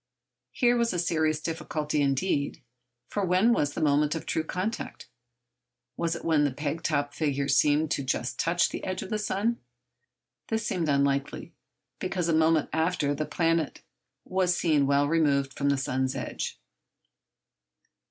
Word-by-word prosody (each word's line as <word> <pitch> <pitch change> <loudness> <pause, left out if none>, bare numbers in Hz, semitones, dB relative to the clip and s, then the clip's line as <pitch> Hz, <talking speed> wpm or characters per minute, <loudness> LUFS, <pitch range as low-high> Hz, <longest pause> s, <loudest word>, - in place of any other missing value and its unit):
Here 245 -2 +3
was 235 -3 +1
a - - -1
serious 160 -3 +1
difficulty 155 -2 -2
indeed. 140 +1 0 0.4
For 205 - -2
when 185 +6 +4
was 145 -9 0
the - - -3
moment 150 +1 +2
of 160 - -5
true 160 - -1
contact? 185 - -4 0.9
Was 170 +2 -1
it - - -8
when 160 -3 +3
the 145 - +2
peg 145 +4 -3
top 145 -3 -1
figure 140 -3 -1
seemed 145 +3 +3 0.2
just 125 -1 -2
to - - +2
touch 170 +1 +2
the - - -6
edge 185 -1 -3
of 190 - -9
the 215 - 0
sun? 210 +3 -1 0.9
This 220 -1 -1
seemed 175 -7 -1
unlikely, 140 0 0 0.5
because 185 -2 -2
a 165 - +2
moment 160 -1 +3
after 160 -2 +1
the 155 +1 -3
planet 165 0 0 0.4
was 185 -1 +1
seen 150 -5 +2
well 140 +1 +3
removed 145 -4 +2
from 140 0 0
the 140 - +2
sun's 130 -1 -1
edge. - - -4
155 Hz, 155 wpm, -27 LUFS, 145-180 Hz, 0.9 s, when